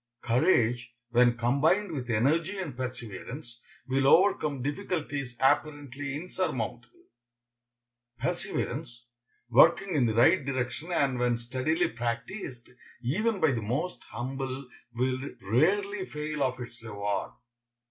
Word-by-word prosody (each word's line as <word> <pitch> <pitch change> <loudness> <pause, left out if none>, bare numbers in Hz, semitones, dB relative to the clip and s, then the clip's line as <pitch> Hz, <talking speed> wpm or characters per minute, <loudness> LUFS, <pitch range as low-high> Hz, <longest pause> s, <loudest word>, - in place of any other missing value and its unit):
Courage, 120 -2 +2 0.2
when 120 0 +4
combined 145 - +2
with 130 -5 -4
energy 155 - +2
and 170 -9 -4
perseverance, 125 0 -6 0.3
will 135 +1 +2
overcome 150 -6 +4
difficulties 145 -5 -3
apparently 140 0 0
insurmountable. 125 - -4 1.1
Perseverance, 120 0 -3 0.5
working 170 - +5
in 130 -5 +3
the 110 - 0
right 160 +8 +5
direction 130 +4 -3
and 135 -7 +1
when 120 -1 +2
steadily 130 +8 0
practiced, 120 - -4 0.4
even 205 - 0
by 160 -5 +4
the 120 -3 -1
most 130 - -2
humble, 135 +1 -5 0.3
will 130 +1 0 0.2
rarely 190 - +1
fail 150 0 -4
of 130 -1 0
its 120 -1 -9
reward. 100 -3 -3
130 Hz, 110 wpm, -29 LUFS, 120-155 Hz, 1.1 s, working